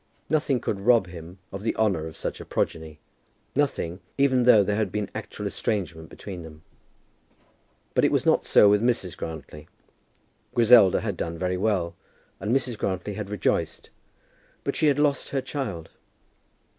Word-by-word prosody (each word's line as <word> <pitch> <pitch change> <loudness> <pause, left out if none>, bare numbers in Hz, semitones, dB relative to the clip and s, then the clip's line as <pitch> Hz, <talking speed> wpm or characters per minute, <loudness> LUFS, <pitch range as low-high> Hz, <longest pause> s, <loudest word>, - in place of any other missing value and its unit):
Nothing 145 -4 +2
could 100 - -3
rob 115 0 +4
him 85 0 -10
of 95 - -6
the 115 - -1
honour 95 -8 +1
of 80 - -10
such - - -4
a - - -9
progeny, 80 -2 -3 0.6
nothing, 115 -11 -1 0.2
even 130 -3 +3
though 110 -5 +7
there 100 +1 0
had 105 -3 -1
been 105 0 -2
actual - - -6
estrangement 85 -6 -3
between 95 -4 -8
them. 80 -1 -12 1.3
But - - +2
it - - +4
was - - +1
not - - +3
so 105 - +6
with 105 0 +4
Mrs. 115 -7 0
Grantly. 75 -1 -8 0.9
Griselda 115 -5 +6
had - - -3
done 85 0 -4
very 90 +1 -1
well, 90 -4 0 0.4
and 105 +4 -2
Mrs. 125 -3 +1
Grantly 95 +1 -2
had 105 -1 -5
rejoiced; 105 -2 -1 0.7
but - - -2
she 155 - +2
had 145 -2 +3
lost 145 -1 +1
her 140 - -1
child. 125 - -5
100 Hz, 160 wpm, -25 LUFS, 85-120 Hz, 1.3 s, though